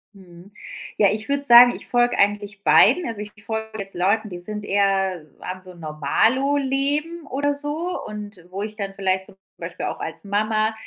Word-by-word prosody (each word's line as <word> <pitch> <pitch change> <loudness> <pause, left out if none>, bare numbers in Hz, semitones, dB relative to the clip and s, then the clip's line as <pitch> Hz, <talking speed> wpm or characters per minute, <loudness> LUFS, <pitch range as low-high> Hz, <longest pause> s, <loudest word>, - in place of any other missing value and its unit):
Mhm. 180 0 -16 0.5
Ja, 205 - +5
ich 215 +1 -4
würde 280 0 0
sagen, 245 -2 +8
ich - - -9
folge 245 0 +2
eigentlich 205 0 0
beiden, 340 +11 +5
also 225 -3 -5
ich 210 0 -8
folge 220 0 -5
jetzt 195 0 -6
Leuten, 200 +5 +1
die 180 -2 -7
sind 210 +4 -6
eher 195 -4 0 0.2
haben 185 0 -6
so 185 - -12
'n - - -15
Normalo-Leben 275 - 0
oder 285 +2 0
so 295 +5 -3
und 210 -2 -8
wo 190 +2 -5
ich 215 0 -7
dann 200 -2 -4
vielleicht 190 -1 -1
zum - - -13 0.2
Beispiel - - -6
auch - - -5
als - - -6
Mama 215 +2 0
210 Hz, 180 wpm, -22 LUFS, 195-260 Hz, 0.5 s, sagen